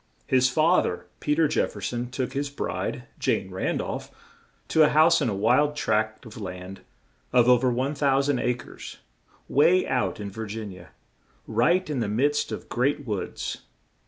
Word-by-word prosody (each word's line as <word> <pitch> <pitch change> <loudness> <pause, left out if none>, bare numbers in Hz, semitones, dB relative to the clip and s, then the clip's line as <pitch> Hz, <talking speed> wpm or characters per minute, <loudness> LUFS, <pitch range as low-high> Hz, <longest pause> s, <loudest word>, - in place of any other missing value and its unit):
His 130 -1 +3
fa 160 +7 +4
ther, - - -4
Pe 150 - 0
ter 160 0 +3
Jef 150 - 0
fer 105 - -8
son, 120 +5 -3
took 130 0 -3
his 140 +1 -2
bride, 140 - -3 0.2
Jane 95 -1 0
Ran 95 - -1
dolph, - - -4 0.6
to 160 - +4
a 150 - +7
house 160 +2 +5
on 130 - +1
a 100 - -2
wild 125 +9 +3
tract 110 -2 -1
of 110 -1 -10
land 90 0 -7 0.5
of 125 -1 +4
o 125 - +8
ver 130 +1 +2
1,000 140 +1 +1
a 125 - +1
cres, - - -10 0.5
way 170 +6 +4
out 125 -4 -1
in 100 -1 -5
Vir 110 +2 -6
gin 105 -1 -6
ia, 90 -3 -13 0.6
right 160 +12 +2
in 150 -4 -2
the 115 - -1
midst 140 +8 +1
of - - -6
great 140 +3 0
woods. 105 -5 -4
125 Hz, 180 wpm, -26 LUFS, 110-145 Hz, 0.6 s, o